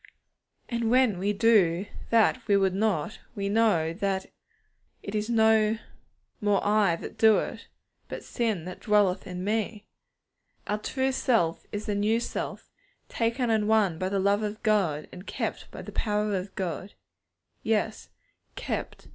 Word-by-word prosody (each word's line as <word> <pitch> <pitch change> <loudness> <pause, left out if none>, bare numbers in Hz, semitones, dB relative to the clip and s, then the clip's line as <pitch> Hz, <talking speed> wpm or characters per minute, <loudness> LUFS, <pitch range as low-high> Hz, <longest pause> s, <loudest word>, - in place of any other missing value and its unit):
And 235 -2 -1
when 245 -6 +3
we 200 +2 +1
do 200 -5 +3 0.2
that 230 +2 +3
we 200 -2 +4
would 190 -1 +2
not, 200 -3 -1 0.2
we 200 -1 -2
know 200 -7 +2
that 195 0 -1 0.8
'it 200 - -6
is 215 +1 -1
no 220 -1 +4 0.6
more 205 -2 +3
I 205 -4 +3
that - - -9
do 220 -1 +6
it, - - -4 0.4
but - - -7
sin 220 -9 -2
that 185 - -7
dwelleth 205 -3 +2
in 180 -1 -5
me.' 215 +1 -2 0.8
Our 210 +1 -1
true 265 +4 -1
self 225 -11 +1
is 205 +1 -4
the 210 - -1
new 210 +3 +2
self, 235 - -5 0.4
taken 235 +1 0
and 215 -1 +2
won 205 -7 +2
by 185 - -1
the 200 - -1
love 200 +2 +2
of 215 +1 -4
God, 190 -9 +1
and 180 +2 -11
kept - - -4
by - - -9
the - - -8
power 210 -1 0
of 190 +1 -5
God. 185 +1 -4 0.7
Yes, 220 0 -1 0.5
'_kept! - - -4
210 Hz, 155 wpm, -27 LUFS, 190-220 Hz, 0.8 s, do